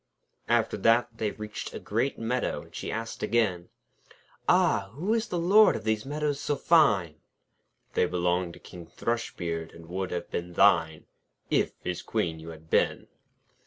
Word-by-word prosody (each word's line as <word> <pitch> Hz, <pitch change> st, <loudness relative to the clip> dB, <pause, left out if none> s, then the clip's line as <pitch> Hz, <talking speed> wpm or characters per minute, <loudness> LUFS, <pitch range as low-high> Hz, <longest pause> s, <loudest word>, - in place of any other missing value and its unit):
After 120 Hz, -2 st, +2 dB
that 115 Hz, +4 st, +3 dB
they 110 Hz, -, 0 dB
reached 105 Hz, 0 st, -7 dB
a -, -, -4 dB
great 120 Hz, +6 st, -1 dB
meadow, 120 Hz, +3 st, -1 dB
and -, -, -19 dB
she -, -, -4 dB
asked 115 Hz, +1 st, -5 dB
again: 95 Hz, -7 st, 0 dB, 0.8 s
'Ah! 95 Hz, -1 st, +3 dB
who 180 Hz, -, -1 dB
is 230 Hz, 0 st, 0 dB
the 180 Hz, -, -3 dB
Lord 195 Hz, +6 st, +6 dB
of -, -, -5 dB
these 110 Hz, +2 st, -1 dB
meadows 145 Hz, -1 st, -1 dB
so 145 Hz, -, -1 dB
fine?' 120 Hz, -, +3 dB, 0.8 s
'They -, -, +2 dB
belong 90 Hz, 0 st, 0 dB
to -, -, -12 dB
King 85 Hz, -2 st, -12 dB
Thrushbeard, 85 Hz, -6 st, -3 dB
and 85 Hz, 0 st, -12 dB
would 95 Hz, +2 st, -3 dB
have 85 Hz, -1 st, -5 dB
been 85 Hz, 0 st, -4 dB
thine, 85 Hz, -4 st, +3 dB, 0.5 s
If -, -, +2 dB
his -, -, -3 dB
Queen 80 Hz, -1 st, -2 dB
you 80 Hz, +1 st, -9 dB
had 80 Hz, -1 st, -11 dB
been.' -, -, +1 dB
105 Hz, 160 wpm, -28 LUFS, 85-125 Hz, 0.8 s, Lord